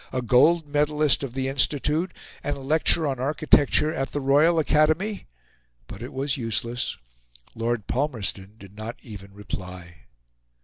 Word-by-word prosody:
a 130 -1 -2
gold 150 +8 +4
medallist 150 0 +1
of 135 -3 -6
the 130 0 -1
Institute, 150 +5 0 0.3
and 145 -1 -2
a - - -9
lecturer 155 +3 +2
on 135 -3 -2
architecture 150 +2 +3
at 135 -5 -3
the 145 - -1
Royal 145 +5 +4
Academy; 160 +7 +1 0.6
but 100 - -10
it 120 - -7
was 135 +1 -2
useless 120 0 -2 0.6
Lord 115 -2 -2
Palmerston 110 -7 -3
did 100 -2 -14
not 110 +2 -6
even 100 -3 -10
reply. 90 -3 -9
135 Hz, 140 wpm, -25 LUFS, 115-150 Hz, 0.6 s, gold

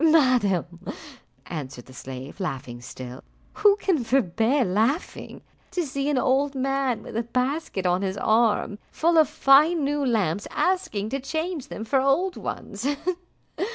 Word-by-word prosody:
"Madam," 220 - +3 0.6
answered 140 -6 -7
the 130 - -15
slave, 130 +5 -8
laughing 135 -9 -4
still, 125 0 -9 0.3
"who 415 -1 +5
can 370 -9 0
forbear 235 +2 +2
laughing, 220 - -1 0.3
to 360 -2 -2
see 275 +1 -2
an 290 - +1
old 275 +3 +2
man 270 -2 0
with - - -9
a 230 - +1
basket 250 - -2
on 180 +1 +2
his 195 0 -2
arm, 215 -1 +2
full 335 +1 +2
of 315 -1 +5
fine 300 +4 +5
new 290 +1 0
lamps, 205 - 0
asking 360 - 0
to 275 - -2
change 315 +3 -3
them 220 - -6
for 265 +4 +2
old 340 +8 +2
ones? 210 +5 -5
255 Hz, 145 wpm, -25 LUFS, 190-290 Hz, 0.6 s, who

